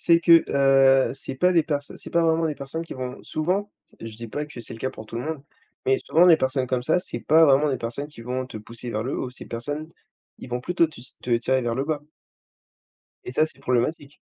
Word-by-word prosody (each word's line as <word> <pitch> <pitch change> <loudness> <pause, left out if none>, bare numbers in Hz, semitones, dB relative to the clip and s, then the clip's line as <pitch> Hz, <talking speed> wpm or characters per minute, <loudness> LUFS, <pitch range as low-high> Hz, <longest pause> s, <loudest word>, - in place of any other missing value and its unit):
C'est 170 0 +4
que, 170 -1 +6
heu, 135 -1 +4
c'est 135 - -6
pas 180 +6 +3
des 165 -3 +4
perso 145 -2 -3
c'est - - -8
pas 170 - +2
vraiment 165 0 +2
des 155 - -2
personnes 140 +4 -6
qui - - -8
vont 130 0 -6
souvent, 185 +6 -1 0.2
s - - -25
je 110 - -12
dis 115 0 -7
pas 150 +6 -4
que 150 -5 -9
c'est 115 - -6
le - - -11
cas 130 - -1
pour 110 - -11
tout 115 - -7
le 120 - -3
monde, 155 -1 -4 0.4
mais 135 0 +3
souvent 170 +3 +5
des 170 -3 +8
personnes 130 -2 0
comme 125 -1 0
ça, 160 +6 +3
c'est - - -5
pas 160 +2 +5
vraiment 145 0 +4
des 135 - -1
personnes 120 +5 -4
qui 150 -5 -14
vont 125 +2 -3
te 130 - -9
pousser 115 +3 -7
vers 110 -1 -2
le 130 +4 -3
haut. 130 - -3
Ces 125 - -9
personnes, 145 +7 -5 0.5
ils - - -10
vont 125 0 -2
plutôt 170 +5 +2
tus 130 -5 -7
te 125 - -6
tirer 130 +2 +1
vers 120 -1 -1
le 135 +3 -1
bas 150 -1 -2 1.2
et - - -6
ça, 155 +4 +3
c'est 155 - -9
problématique. 140 +3 -1
135 Hz, 250 wpm, -24 LUFS, 125-160 Hz, 1.2 s, des